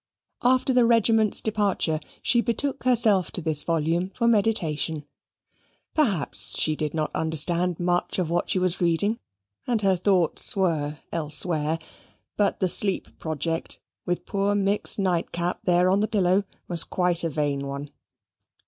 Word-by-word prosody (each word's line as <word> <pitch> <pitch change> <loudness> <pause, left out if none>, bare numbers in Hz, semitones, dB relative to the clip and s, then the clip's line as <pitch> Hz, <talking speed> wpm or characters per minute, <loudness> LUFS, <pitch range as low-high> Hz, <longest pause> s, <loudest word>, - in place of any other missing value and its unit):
After 255 +1 +2
the 250 -1 +4
regiment's 225 -2 +3
departure 200 -7 0 0.2
she 240 - +3
betook 255 +3 -2
herself 220 -7 +3
to - - -1
this 155 -3 0
volume 165 +3 -1
for 235 - 0
meditation; 165 -9 0 0.9
perhaps 205 - +1
she 155 - +2
did 150 0 -3
not 155 -1 -1
understand 165 +2 +1
much 175 0 -1
of 180 -3 0
what 170 +2 -1
she 195 - +1
was 185 0 -1
reading, 190 +7 +1 0.5
and 230 -4 0
her 190 -1 +3
thoughts 180 -2 +1
were 155 -6 0
elsewhere: 155 0 0 0.6
but 205 -1 0
the 185 - +3
sleep 190 +2 +1
project, 160 +1 -4 0.2
with 175 0 -3
poor 200 0 0
Mick's 200 +1 +2
nightcap 175 -2 -1
there 180 0 +3
on 190 +2 +3
the 215 - +1
pillow, 195 -2 +1 0.2
was 170 -2 -2
quite 180 -1 -1
a 165 - 0
vain 140 -2 -2
one. 140 +1 -6
180 Hz, 145 wpm, -24 LUFS, 160-205 Hz, 0.9 s, the